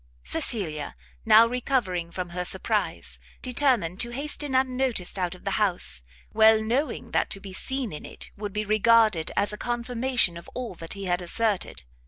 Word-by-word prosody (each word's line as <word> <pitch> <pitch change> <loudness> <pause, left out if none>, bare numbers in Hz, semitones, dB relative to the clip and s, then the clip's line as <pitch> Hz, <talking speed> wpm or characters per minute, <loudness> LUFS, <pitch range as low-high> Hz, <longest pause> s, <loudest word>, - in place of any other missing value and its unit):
Cecilia 155 - -3 0.3
now 220 +1 +8
recovering 230 -8 -1
from 180 +1 -5
her 180 +1 -3
surprise, - - -2 0.2
determined 245 - +1
to 240 - +1
hasten 285 +2 -2
unnoticed 255 -7 0
out 180 0 -1
of 180 - -17
the 200 - 0
house, 175 - +2 0.3
well 220 0 +6
knowing 255 +7 -1
that - - +1
to 195 - -4
be 195 -1 -9
seen 265 - -2
in 150 - -7
it - - -8
would 205 0 -5
be 210 +2 -2
regarded 215 -4 +4
as 205 +1 +1
a - - -5
confirmation 240 -5 +1
of 170 - -11
all 250 -5 -4
that 165 -1 -7
he 200 - -7
had 180 0 0
asserted. 205 - -1
215 Hz, 170 wpm, -26 LUFS, 180-245 Hz, 0.3 s, now